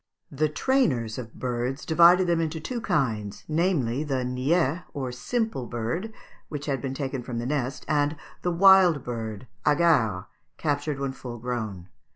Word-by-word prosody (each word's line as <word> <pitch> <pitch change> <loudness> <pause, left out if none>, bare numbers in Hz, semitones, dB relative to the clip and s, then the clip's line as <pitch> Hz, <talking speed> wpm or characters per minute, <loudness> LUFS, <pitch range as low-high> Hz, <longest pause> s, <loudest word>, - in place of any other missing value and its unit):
] - - -49
The 150 +2 +1
trainers 145 - +1
of 115 -2 -8
birds 125 +2 -3
divided 175 +3 +6
them 170 -1 +2
into 160 0 -2
two 235 +9 -4
kinds, 125 - -1
namely, 155 -6 +1
the 135 -4 -1
niais 140 +6 +1
or 130 -3 -3
simple 220 - -2
bird, 120 - -3 0.4
which 150 -1 -5
had 135 -4 -1
been 135 -1 -3
taken 135 -2 -3
from 120 0 -5
the 120 - -3
nest, 130 -1 -2
and 145 0 +1 0.3
the 180 - 0
wild 180 -4 +6
bird 110 -2 -5 0.2
(hagard) 145 - +3 0.3
captured 145 -1 -1
when 135 -1 -2
full 125 -2 -8
grown. 110 -7 -4
140 Hz, 160 wpm, -26 LUFS, 120-165 Hz, 0.4 s, divided